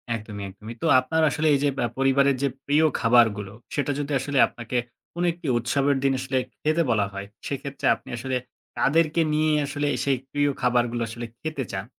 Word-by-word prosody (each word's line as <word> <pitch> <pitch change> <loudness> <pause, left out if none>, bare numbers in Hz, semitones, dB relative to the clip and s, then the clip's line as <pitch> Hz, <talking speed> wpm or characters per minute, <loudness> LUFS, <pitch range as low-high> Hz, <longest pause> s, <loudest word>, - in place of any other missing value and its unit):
একদমই, 105 -2 -7
একদমই। 105 +4 -10
তো 165 - 0
আপনার 160 +5 0
আসলে 155 +2 0
এই 140 - +3
যে 145 - +3
বা 120 - +1
পরিবারের 135 +1 +3
যে - - +4 0.2
প্রিয় 150 +3 +3
খাবারগুলো, 110 -4 +3 0.2
সেটা 145 0 0
যদি 145 0 -3
আসলে 140 +2 -2
আপনাকে 120 +1 -5 0.4
কোন 175 - -2
একটি 170 -2 -9
উৎসবের 135 +4 +1
দিন 135 - +3
আসলে 130 0 -2 0.2
খেতে 155 +2 +2
বলা 105 -3 +2
হয়? 100 0 -6 0.2
সেক্ষেত্রে 140 0 -5
আপনি - - -16
আসলে 130 +2 -3 0.4
কাদেরকে 160 +2 +2
নিয়েই 155 0 +2
আসলে 145 +1 -2 0.2
সেই 135 -2 +2
প্রিয় 145 0 +2
খাবারগুলো 120 -1 +1
আসলে 120 +1 -6 0.2
খেতে 155 -4 -3
চান? 95 0 -3
135 Hz, 180 wpm, -25 LUFS, 120-145 Hz, 0.4 s, যে